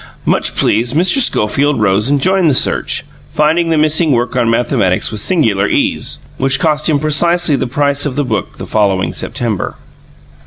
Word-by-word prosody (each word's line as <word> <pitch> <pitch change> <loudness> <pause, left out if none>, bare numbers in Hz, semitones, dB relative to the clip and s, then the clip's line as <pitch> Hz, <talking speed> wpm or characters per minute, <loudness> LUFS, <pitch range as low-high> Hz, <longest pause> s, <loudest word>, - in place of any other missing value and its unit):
Much - - +1
pleased, 120 +4 0
Mr. 185 - +4
Schofield 145 - +1
rose 105 +3 +1
and 140 -1 0
joined 190 -3 +2
the 140 - +1
search, 140 - 0 0.3
finding 160 +3 +1
the 160 - +1
missing 155 +1 +2
work 120 -1 -1
on 120 -2 +1
mathematics 115 -6 0
with 105 -2 -3
singular 110 - +1
ease - - -1 0.2
which 135 +1 +1
cost 155 -2 0
him 150 - +2
precisely 155 +2 +2
the 130 -1 -2
price 140 +2 0
of 145 -4 -3
the 145 -1 -1
book 110 -6 -4
the - - -6
following 100 -3 0
September. 110 -6 -3
140 Hz, 170 wpm, -13 LUFS, 115-155 Hz, 0.3 s, Mr